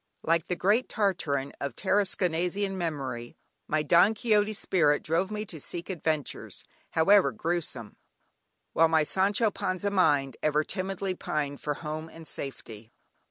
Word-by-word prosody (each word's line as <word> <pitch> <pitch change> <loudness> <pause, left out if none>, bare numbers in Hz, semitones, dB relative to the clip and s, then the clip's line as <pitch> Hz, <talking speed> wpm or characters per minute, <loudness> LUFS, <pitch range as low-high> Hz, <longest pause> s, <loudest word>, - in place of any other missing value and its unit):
Like 165 0 +1
the 180 - -1
great 210 +8 +2
"Tartarin" 165 - 0
of 140 -4 -3
"Tarasconnasian" 190 -1 0
memory, 145 -6 -4 0.3
my 155 0 +1
"Don 175 +8 +5
Quixote" 215 -2 +2
spirit 160 -7 +2
drove 170 +4 +1
me 210 0 -4
to 160 -7 -8
seek 175 +5 -5
adventures, 155 -5 -3 0.3
however 195 +5 +5
gruesome, 160 -9 -3 0.8
while 165 - +5
my 160 -1 +3
"Sancho 200 +6 +2
Panza" 185 +2 -2
mind 145 -8 +2
ever 150 0 +2
timidly 190 +1 -3
pined 145 -5 -3
for 145 -1 -2
home 155 +1 -5
and 165 -1 -12
safety. 115 -5 -7
170 Hz, 135 wpm, -28 LUFS, 150-195 Hz, 0.8 s, Don